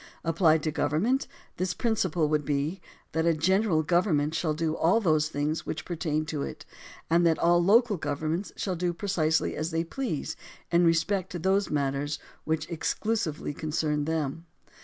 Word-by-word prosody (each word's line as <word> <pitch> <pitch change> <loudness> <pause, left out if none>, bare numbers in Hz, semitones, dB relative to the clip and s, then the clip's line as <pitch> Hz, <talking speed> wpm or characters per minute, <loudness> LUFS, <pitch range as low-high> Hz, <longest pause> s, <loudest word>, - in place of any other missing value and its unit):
Applied 165 -2 +3
to 155 - 0
government, 170 - +1 0.3
this 185 0 -1
principle 185 -9 +1
would 150 0 +1
be, 145 +6 -1 0.3
that 160 +1 0
a 165 - +3
general 185 +1 +2
government 155 -3 +2
shall 160 -1 0
do 160 0 -1
all 175 +8 +3
those 155 -7 +2
things 150 +1 -1
which 155 - -5
per 175 - -4
tain 155 -2 -1
to 155 -2 -3
it, - - -6 0.4
and 170 +1 +4
all 175 +1 +4
the 175 - 0
local 225 0 +5
governments 155 +5 -2
shall 190 -3 -2
do 175 0 -1
precisely 165 -4 0
as 155 +2 -2
they 165 0 0
please 170 - -3 0.4
in 175 0 +4
respect 170 +3 +1
to - - -2
those 190 +4 +1
matters 145 0 -1 0.3
which 160 0 -1
exclusively 170 -2 -2
con 155 +2 -5
cern 150 -1 0
them. 160 +1 -2
165 Hz, 170 wpm, -28 LUFS, 155-180 Hz, 0.4 s, local